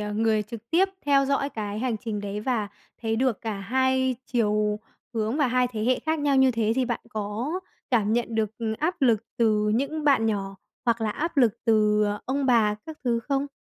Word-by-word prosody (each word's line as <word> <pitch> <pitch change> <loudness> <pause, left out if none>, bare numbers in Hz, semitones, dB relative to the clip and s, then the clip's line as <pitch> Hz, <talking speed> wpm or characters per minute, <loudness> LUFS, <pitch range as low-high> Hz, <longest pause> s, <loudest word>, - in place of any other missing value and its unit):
à, 210 0 -3
người 220 0 +2
trực 230 +2 -10
tiếp 375 +4 +4 0.2
theo 280 -1 +4
dõi 280 0 +1
cái 210 -3 -4
hành 245 -2 -1
trình 215 -2 -4
đấy 205 0 -4
và 220 -3 -1 0.3
thấy 225 -1 0
được 250 -3 +1
cả 220 -3 -4
hai 260 +3 +1
chiều 210 -3 +1 0.4
hướng 220 +3 0
và 295 -3 +3
hai 250 0 +2
thế 215 -2 -2
hệ 255 +1 +2
khác 315 +1 -1
nhau 290 -2 +2
như 265 0 +5
thế 225 -2 +1
thì 260 - +2
bạn 240 -1 -2
có 215 +6 -3 0.4
cảm 220 -4 +2
nhận 235 0 0
được, 220 -2 +1
ừm, 225 -2 -1
áp 320 0 -1
lực 230 -4 +3
từ 215 -2 +2
những 285 +5 -1
bạn 275 -6 +4
nhỏ, 195 -2 -2 0.3
hoặc 235 -2 +1
là 220 -1 0
áp 330 +8 -3
lực 235 -4 +3
từ, 210 -1 +3
à, 205 0 -2
ông 270 +1 -1
bà 225 -4 +4
các 315 -1 -7
thứ 235 -1 +1
không? 275 +2 -2
230 Hz, 215 wpm, -26 LUFS, 215-265 Hz, 0.4 s, như